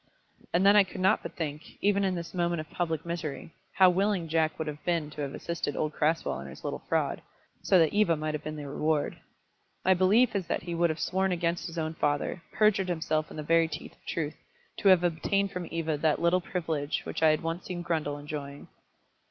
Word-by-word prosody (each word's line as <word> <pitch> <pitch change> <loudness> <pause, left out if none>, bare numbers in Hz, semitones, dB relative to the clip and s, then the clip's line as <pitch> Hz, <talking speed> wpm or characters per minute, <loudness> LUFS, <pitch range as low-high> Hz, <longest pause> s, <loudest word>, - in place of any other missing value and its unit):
And 180 +3 +2
then 200 +1 +7
I 205 - +8
could 190 0 -9
not 190 +3 +3
but - - -8
think, 150 -2 -5
even 200 0 +2
in 190 -1 +1
this 170 -1 -6
moment 175 -2 0
of 155 - -7
public 165 -2 -2
misery, 165 -2 -5 0.2
how 185 -1 +6
willing 190 -2 +1
Jack 160 0 +1
would 160 - -3
have 150 0 -6
been 165 -4 0
to 150 - -6
have 140 -1 -3
assisted 170 -4 -3
old 155 0 -1
Crasweller 155 - 0
in 70 - -8
his 65 - -11
little - - -4
fraud, - - 0 0.4
so 190 - +4
that 160 -3 +4
Eva 205 -5 +4
might 155 0 -3
have 150 0 -4
been 155 0 -5
the 145 -1 -6
reward. 150 +1 -1 0.7
My 190 - +6
belief 205 +6 +4
is 190 -3 -1
that - - -2
he 170 0 -4
would 170 0 +2
have 160 0 -3
sworn 190 +3 0
against 170 -1 -1
his 170 0 -8
own 160 0 -1
father, 145 +2 -1
perjured 205 -3 +3
himself 155 -2 -1
in - - -10
the 155 - -4
very 165 +1 +4
teeth 155 -1 -7
of - - -29
truth, 155 -2 -3 0.4
to - - +1
have 185 -2 +7
obtained 195 +4 +1
from 180 -3 -5
Eva 160 -2 -1
that 155 -1 +2
little 170 +2 +3
privilege 160 -5 -2
which - - -5
I 160 - +6
had 155 +1 +1
once 165 +2 -3
seen 175 -2 -4
Grundle 155 -4 -1
enjoying. 145 -1 -7
165 Hz, 225 wpm, -29 LUFS, 155-180 Hz, 0.7 s, I